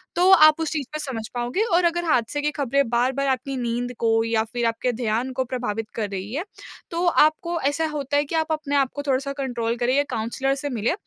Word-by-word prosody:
तो 360 Hz, +2 st, +4 dB
आप 310 Hz, -3 st, +7 dB
उस 320 Hz, -, -1 dB
चीज 290 Hz, -4 st, -2 dB
को 305 Hz, -, -3 dB
समझ 250 Hz, -7 st, -4 dB
पाओगे 245 Hz, -, -1 dB
और 355 Hz, -, +4 dB
अगर 345 Hz, +1 st, +1 dB
हादसे 290 Hz, -2 st, +1 dB
की 300 Hz, +1 st, 0 dB
ख़बरें 280 Hz, -2 st, 0 dB
बार-बार 255 Hz, +4 st, +1 dB
आपकी 265 Hz, +1 st, -1 dB
नींद 245 Hz, 0 st, -2 dB
को 225 Hz, -1 st, +2 dB
या 225 Hz, -1 st, +1 dB
फिर 240 Hz, -1 st, -1 dB
आपके 230 Hz, +2 st, 0 dB
ध्यान 235 Hz, +2 st, -1 dB
को 260 Hz, +1 st, 0 dB
प्रभावित 235 Hz, -4 st, -3 dB
कर 210 Hz, -3 st, -2 dB
रही 195 Hz, +2 st, -5 dB
है। 305 Hz, +6 st, -2 dB, 0.5 s
तो 340 Hz, +1 st, -1 dB
आपको 335 Hz, +1 st, +3 dB
ऐसा 290 Hz, +4 st, +1 dB
होता 285 Hz, -1 st, -1 dB
है 290 Hz, -, +2 dB
कि 325 Hz, -, -4 dB
आप 320 Hz, 0 st, 0 dB
अपने 305 Hz, -2 st, -1 dB
आप 275 Hz, -2 st, +2 dB
को 285 Hz, -, -3 dB
थोड़ा-सा 275 Hz, +1 st, 0 dB
कंट्रोल 240 Hz, -4 st, -2 dB
करें 245 Hz, +2 st, +1 dB
या 285 Hz, -, +4 dB
काउंसलर 250 Hz, +5 st, -1 dB
से 290 Hz, +1 st, -4 dB
मिलें। 235 Hz, -1 st, 0 dB
265 Hz, 230 wpm, -23 LUFS, 235-295 Hz, 0.5 s, आप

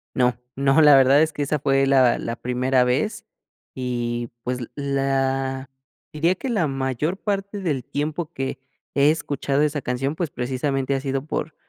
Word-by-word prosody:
No, 125 Hz, -1 st, +2 dB, 0.2 s
no, 135 Hz, +3 st, +3 dB
la 150 Hz, -2 st, +8 dB
verdad 135 Hz, +2 st, +6 dB
es 160 Hz, -, +1 dB
que 145 Hz, -, -3 dB
esa 150 Hz, +2 st, 0 dB
fue 135 Hz, -1 st, +2 dB
la 130 Hz, -3 st, +4 dB
la 115 Hz, +1 st, -4 dB
primera 125 Hz, +1 st, +1 dB
vez, 210 Hz, -, -1 dB, 0.5 s
y 120 Hz, -2 st, -3 dB
pues, 125 Hz, 0 st, -2 dB
l 120 Hz, -, -7 dB
la 135 Hz, -1 st, -1 dB, 0.4 s
diría 165 Hz, +4 st, +2 dB
que 265 Hz, -, -5 dB
la 200 Hz, -10 st, +1 dB
mayor 135 Hz, +6 st, -2 dB
parte 200 Hz, -1 st, -3 dB
del 145 Hz, -9 st, -2 dB
tiempo 155 Hz, +2 st, -3 dB
que 135 Hz, 0 st, -4 dB, 0.4 s
he 140 Hz, +2 st, +5 dB
escuchado 145 Hz, -2 st, -1 dB
esa 150 Hz, -1 st, 0 dB
canción, 130 Hz, +4 st, -2 dB
pues, 170 Hz, -5 st, -2 dB
precisamente 135 Hz, +2 st, -1 dB
ha 135 Hz, -, -1 dB
sido 135 Hz, 0 st, -2 dB
por 155 Hz, 0 st, -4 dB
135 Hz, 170 wpm, -23 LUFS, 130-150 Hz, 0.5 s, la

